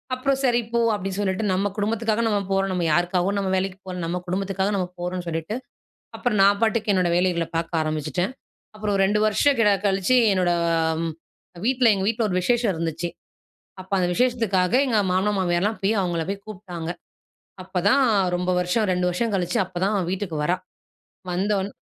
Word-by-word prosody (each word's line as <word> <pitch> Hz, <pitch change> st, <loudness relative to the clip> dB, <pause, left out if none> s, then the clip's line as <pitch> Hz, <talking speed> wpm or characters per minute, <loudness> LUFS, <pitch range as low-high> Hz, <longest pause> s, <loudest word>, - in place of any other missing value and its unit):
அப்புறம் 270 Hz, +1 st, 0 dB
சரி 240 Hz, -1 st, +3 dB
போ 235 Hz, -, +3 dB, 0.2 s
அப்டீ 195 Hz, -1 st, -4 dB
சொல்லிட்டு, 190 Hz, +1 st, -1 dB
நம்ம 195 Hz, +2 st, +1 dB
குடும்பத்துக்காக 225 Hz, +2 st, 0 dB
நம்ம 210 Hz, -2 st, +1 dB
போறோம். 195 Hz, 0 st, +1 dB
நம்ம 175 Hz, -2 st, -1 dB
யாருக்காகவும் 180 Hz, +4 st, +1 dB
நம்ம 195 Hz, -1 st, -1 dB
வேலைக்கு 190 Hz, 0 st, -2 dB
போல, 180 Hz, -, -5 dB
நம்ம 170 Hz, +2 st, -2 dB
குடும்பத்துக்காக 195 Hz, +2 st, -1 dB
நம்ம 180 Hz, -2 st, -1 dB
போறோம்ன்னு 180 Hz, 0 st, -4 dB
சொல்லிட்டு, 165 Hz, +6 st, -3 dB, 0.6 s
அப்புறம் 240 Hz, -5 st, 0 dB
நான் 200 Hz, +1 st, +5 dB
பாட்டுக்கு 220 Hz, -1 st, +1 dB
என்னோட 180 Hz, -2 st, +2 dB
வேலைகள 175 Hz, -2 st, +1 dB
பார்க்க 165 Hz, 0 st, -1 dB
ஆரம்பிச்சுட்டேன். 155 Hz, -, -2 dB, 0.4 s
அப்புறம் 210 Hz, -2 st, -1 dB
2 205 Hz, +2 st, +2 dB
வருஷம் 255 Hz, +6 st, +3 dB
க -, -, +5 dB, 0.2 s
கழிச்சு, 195 Hz, +6 st, +2 dB, 0.2 s
என்னோட 180 Hz, -2 st, +2 dB, 1.2 s
வீட்டில 250 Hz, -3 st, +4 dB
எங்க 190 Hz, -, -2 dB
வீட்டில 225 Hz, 0 st, +1 dB
ஒரு 185 Hz, -, 0 dB
விசேஷம் 235 Hz, +1 st, +2 dB
இருந்துச்சு. 165 Hz, +1 st, -3 dB, 0.7 s
அப்போ 185 Hz, +1 st, -12 dB
அந்த 180 Hz, -1 st, +1 dB
விசேஷத்துக்காக 225 Hz, -5 st, +1 dB
எங்க 225 Hz, -4 st, +2 dB
மாமனார் 200 Hz, +2 st, +1 dB
மாமியார்லாம் 185 Hz, +4 st, 0 dB
போய் 210 Hz, +3 st, +2 dB
அவங்களை 170 Hz, -3 st, -1 dB
போய் 200 Hz, 0 st, -4 dB
கூப்பிட்டாங்க. 180 Hz, -5 st, -7 dB, 0.7 s
அப்போதான் 185 Hz, +9 st, +2 dB, 0.3 s
ரொம்ப 180 Hz, +1 st, -1 dB
வருஷம் 190 Hz, +5 st, +1 dB
2 180 Hz, 0 st, 0 dB
வருஷம் 220 Hz, +5 st, -1 dB
கழிச்சு 180 Hz, +4 st, 0 dB
அப்போதான் 185 Hz, +3 st, -1 dB
வீட்டுக்கு 185 Hz, -4 st, -3 dB
வரா. 180 Hz, +4 st, +1 dB, 0.8 s
வந்தோன் 195 Hz, +2 st, 0 dB
190 Hz, 160 wpm, -23 LUFS, 180-215 Hz, 1.2 s, நான்